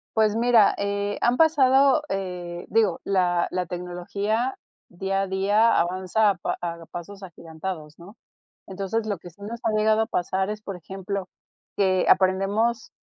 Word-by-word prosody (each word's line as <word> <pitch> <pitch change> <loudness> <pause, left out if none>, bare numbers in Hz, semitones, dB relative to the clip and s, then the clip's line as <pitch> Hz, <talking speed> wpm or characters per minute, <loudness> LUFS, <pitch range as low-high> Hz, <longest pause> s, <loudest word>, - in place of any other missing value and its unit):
Pues 220 -1 +3
mira, 230 -2 +4
eh, 200 0 -2
han 240 +1 +2
pasado, 280 -2 +4
eh, 180 -3 -4
digo 215 -6 +2
la 180 -3 +1
la 180 0 -2
tecnología 190 +7 -3 0.3
día 195 +2 -2
a 195 - -2
día 205 +4 +3
avanza 185 +4 +1
a - - -4
pa 175 - -3
a 170 -1 -5
pasos 195 +3 -8
agigantados, 160 -2 -7
¿no? 190 +6 -14 0.5
Entonces, 200 +3 -3
lo 200 -3 -1
que 175 - -11
sí 185 +5 -23
nos 230 +3 -7
ha 225 - +1
llegado 215 +1 +3
a 220 - +1
pasar 190 0 -1
es, 210 0 -5
por 200 -2 -6
ejemplo, 190 +2 -6 0.5
que 185 -2 +2
aprendemos 200 +5 +2
195 Hz, 155 wpm, -24 LUFS, 180-220 Hz, 0.5 s, mira